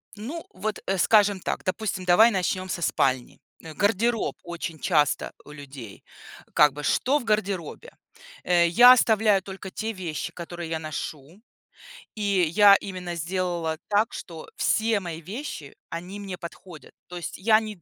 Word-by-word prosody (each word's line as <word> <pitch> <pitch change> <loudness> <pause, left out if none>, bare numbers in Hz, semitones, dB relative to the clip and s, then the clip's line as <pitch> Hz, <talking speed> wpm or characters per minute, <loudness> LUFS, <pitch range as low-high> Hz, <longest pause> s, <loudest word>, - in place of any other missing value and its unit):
Ну 270 +11 -7
вот, 210 +3 -4
а, 195 0 0
скажем 205 0 +4
так. - - -4
Допустим, 185 -1 -3
давай 220 +7 +6
начнем 185 0 -1
со 170 - -3
спальни. 130 -5 0 0.2
Э, 160 -1 -9
гардероб 225 +4 +1
очень 170 -2 -6
часто 150 -5 +1
у 150 - -12
людей. 140 -7 -11 0.5
Как 150 -1 +5
бы 150 0 -8
что 280 +4 +2
в - - -8
гардеробе? 210 - -2 0.5
Э, 175 -1 +3
я 245 +8 +8
оставляю 215 -4 +3
только 190 0 -8
те 220 +2 -3
вещи, 170 -6 -5
которые 170 -1 -7
я 160 -1 -2
ношу. 155 +3 -7 0.7
И 215 - -6 0.3
я 205 -1 +8
именно 185 -3 -5
сделала 170 -1 -2
так, 210 +2 +1
что 165 -3 -8
все 220 -1 +1
мои 170 -3 -7
вещи- 190 - -7
они 180 +4 -7
мне 195 -3 -6
подходят. 170 -2 -11
То 180 - -8
есть 175 - -6
я 215 +3 +4
не 215 -5 -8
185 Hz, 155 wpm, -25 LUFS, 165-210 Hz, 0.7 s, я